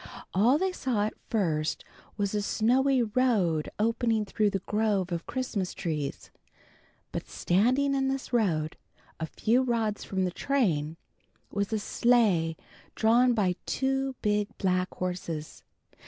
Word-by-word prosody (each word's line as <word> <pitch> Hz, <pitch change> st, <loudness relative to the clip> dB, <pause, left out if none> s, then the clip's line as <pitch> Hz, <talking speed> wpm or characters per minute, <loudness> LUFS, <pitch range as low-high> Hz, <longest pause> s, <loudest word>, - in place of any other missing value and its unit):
All 235 Hz, +9 st, +4 dB
they 380 Hz, +3 st, 0 dB
saw 250 Hz, -, -1 dB
at 215 Hz, -, -3 dB, 0.2 s
first 160 Hz, -8 st, 0 dB, 0.3 s
was 200 Hz, -1 st, -1 dB
a 210 Hz, -, +1 dB
snowy 250 Hz, +5 st, +2 dB
road 210 Hz, -9 st, +1 dB
opening 225 Hz, 0 st, +1 dB
through 205 Hz, +1 st, +1 dB
the 195 Hz, -, -1 dB
grove 210 Hz, -4 st, 0 dB
of 170 Hz, -1 st, -3 dB
Christmas 235 Hz, -8 st, -3 dB
trees, 155 Hz, -7 st, -4 dB, 0.8 s
but -, -, -5 dB
standing 255 Hz, +10 st, +2 dB
in 270 Hz, -1 st, +1 dB
this 270 Hz, -1 st, -3 dB
road, 165 Hz, -10 st, +1 dB, 0.4 s
a 160 Hz, -, -2 dB
few 235 Hz, +9 st, +2 dB
rods 230 Hz, -4 st, -1 dB
from 190 Hz, -1 st, -1 dB
the 180 Hz, -, -1 dB
train, 170 Hz, -, 0 dB, 0.5 s
was 200 Hz, +1 st, -2 dB
a 220 Hz, -, +1 dB
sleigh 205 Hz, -8 st, +2 dB, 0.4 s
drawn 240 Hz, +2 st, +4 dB
by 190 Hz, -5 st, +1 dB
two 270 Hz, 0 st, 0 dB
big 210 Hz, -1 st, +2 dB
black 185 Hz, -1 st, 0 dB
horses. 175 Hz, -4 st, -4 dB
210 Hz, 135 wpm, -28 LUFS, 180-245 Hz, 0.8 s, All